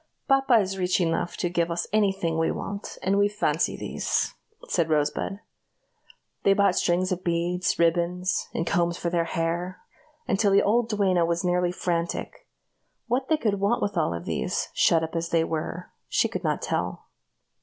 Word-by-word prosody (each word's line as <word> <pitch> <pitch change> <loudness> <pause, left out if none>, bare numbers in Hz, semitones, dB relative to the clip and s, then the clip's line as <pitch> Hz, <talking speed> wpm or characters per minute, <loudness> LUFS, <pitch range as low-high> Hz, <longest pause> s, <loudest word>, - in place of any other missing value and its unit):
"Papa 270 -2 +4
is 195 -3 +1
rich 180 0 +1
enough 170 0 -1
to 180 - 0
give 170 -1 0
us 170 0 -1
any 210 -2 +4
thing 165 -4 -2
we 165 - +2
want, 200 0 -5
and 195 +2 +2
we 205 0 +4
fancy 210 +1 0
these," - - -1 0.3
said 165 -2 +1
Rosebud. 155 +6 0 1.0
They 195 - +4
bought 200 -2 +3
strings 185 +2 +1
of 185 0 -2
beads, 175 +2 0
ribbons, 175 +2 +1
and 165 - -2
combs 170 0 +1
for 170 - -2
their 170 -1 +1
hair, 170 +2 -2 0.5
until 200 +1 +2
the 200 - +5
old 230 +2 +2
duenna 195 -5 +2
was 170 +1 0
nearly 180 0 +2
frantic. 175 - -3 0.6
What 255 +2 -1
they 315 - +4
could 210 -8 0
want 200 +4 +1
of 205 - -2
all 85 0 0
these, 85 - -2
shut 165 -1 +3
up 160 +1 -5
as 165 0 -2
they 165 -1 +2
were, 165 +2 -4 0.2
she - - +2
could - - -5
not - - -1
tell. - - -2
180 Hz, 175 wpm, -26 LUFS, 170-200 Hz, 1.0 s, the